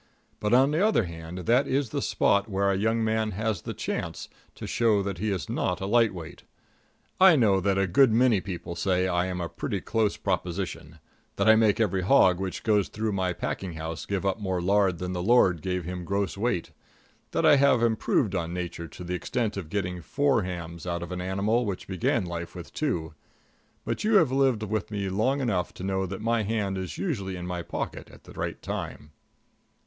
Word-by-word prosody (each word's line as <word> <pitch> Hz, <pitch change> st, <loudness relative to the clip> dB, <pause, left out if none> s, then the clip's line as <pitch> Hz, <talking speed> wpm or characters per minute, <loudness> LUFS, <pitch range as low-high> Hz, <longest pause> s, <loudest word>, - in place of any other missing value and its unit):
But 105 Hz, -, -1 dB
on 130 Hz, +4 st, +5 dB
the 160 Hz, +6 st, +2 dB
other 215 Hz, -, +3 dB
hand, 85 Hz, 0 st, -7 dB
that 125 Hz, +4 st, +3 dB
is 135 Hz, -3 st, 0 dB
the -, -, -1 dB
spot 100 Hz, +2 st, +2 dB
where 100 Hz, 0 st, +1 dB
a -, -, +1 dB
young 110 Hz, +3 st, +1 dB
man 110 Hz, -1 st, 0 dB
has 110 Hz, +2 st, -2 dB
the -, -, -5 dB
chance -, -, -4 dB, 0.3 s
to -, -, -7 dB
show 110 Hz, -4 st, +2 dB
that 95 Hz, -3 st, -4 dB
he 110 Hz, +2 st, -1 dB
is 90 Hz, -8 st, -2 dB
not 90 Hz, -, -1 dB
a 95 Hz, -, -3 dB
light 115 Hz, +2 st, +3 dB
weight. 85 Hz, -4 st, -9 dB, 0.8 s
I 185 Hz, -2 st, +8 dB
know 105 Hz, -8 st, +4 dB
that 95 Hz, +1 st, +1 dB
a 95 Hz, -, +3 dB
good 115 Hz, +8 st, +4 dB
many 115 Hz, -3 st, +4 dB
people 85 Hz, -3 st, -6 dB
say 90 Hz, +1 st, +1 dB
I 90 Hz, 0 st, +1 dB
am 90 Hz, -1 st, -3 dB
a 85 Hz, -, -2 dB
pretty -, -, -4 dB
close 110 Hz, -2 st, 0 dB
proposition; 90 Hz, -4 st, -3 dB, 0.4 s
that -, -, +1 dB
I 110 Hz, -, +8 dB
make 110 Hz, -2 st, +3 dB
every 95 Hz, -4 st, +1 dB
hog 95 Hz, -4 st, +4 dB
which 95 Hz, -1 st, -4 dB
goes 105 Hz, -3 st, +2 dB
through 110 Hz, 0 st, -2 dB
my 95 Hz, -2 st, 0 dB
packing 90 Hz, 0 st, -4 dB
house 80 Hz, -1 st, -6 dB
give 100 Hz, -1 st, -2 dB
up 95 Hz, +2 st, 0 dB
more 95 Hz, -3 st, -1 dB
lard 95 Hz, 0 st, +2 dB
than 90 Hz, +2 st, -4 dB
the 90 Hz, -, -2 dB
Lord 95 Hz, -5 st, +4 dB
gave 90 Hz, +1 st, -2 dB
him 90 Hz, 0 st, -5 dB
gross 100 Hz, +2 st, -1 dB
weight; 105 Hz, -4 st, -1 dB, 0.6 s
that -, -, 0 dB
I 145 Hz, -, +7 dB
have 140 Hz, -4 st, +4 dB
improved 110 Hz, -2 st, +1 dB
on 85 Hz, 0 st, -2 dB
Nature 85 Hz, -1 st, -5 dB
to 90 Hz, -, -10 dB
the 90 Hz, +1 st, -4 dB
extent 110 Hz, +5 st, -2 dB
of 95 Hz, -6 st, -6 dB
getting 90 Hz, -2 st, -2 dB
four 135 Hz, -, +1 dB
hams 85 Hz, -2 st, -6 dB
out 85 Hz, -1 st, -2 dB
of 85 Hz, -, -8 dB
an 90 Hz, 0 st, -3 dB
animal 100 Hz, +6 st, +1 dB
which 100 Hz, -5 st, -4 dB
began 95 Hz, +3 st, 0 dB
life 85 Hz, -1 st, -6 dB
with -, -, -9 dB
two; 80 Hz, -1 st, -2 dB, 0.7 s
but -, -, -2 dB
you 215 Hz, +1 st, +3 dB
have 165 Hz, -10 st, +5 dB
lived 130 Hz, -5 st, +2 dB
with 110 Hz, 0 st, -2 dB
me 100 Hz, -2 st, -3 dB
long 125 Hz, +9 st, +1 dB
enough 100 Hz, -8 st, -1 dB
to -, -, -8 dB
know 95 Hz, 0 st, -1 dB
that 95 Hz, +3 st, -6 dB
my 115 Hz, +1 st, +1 dB
hand 105 Hz, -2 st, -1 dB
is 95 Hz, -2 st, -5 dB
usually 100 Hz, -, -2 dB
in 90 Hz, -1 st, -6 dB
my 90 Hz, -1 st, -3 dB
pocket 85 Hz, -, -5 dB
at -, -, -16 dB
the -, -, -13 dB
right -, -, -5 dB
time. 75 Hz, -, -5 dB
95 Hz, 210 wpm, -27 LUFS, 90-110 Hz, 0.8 s, I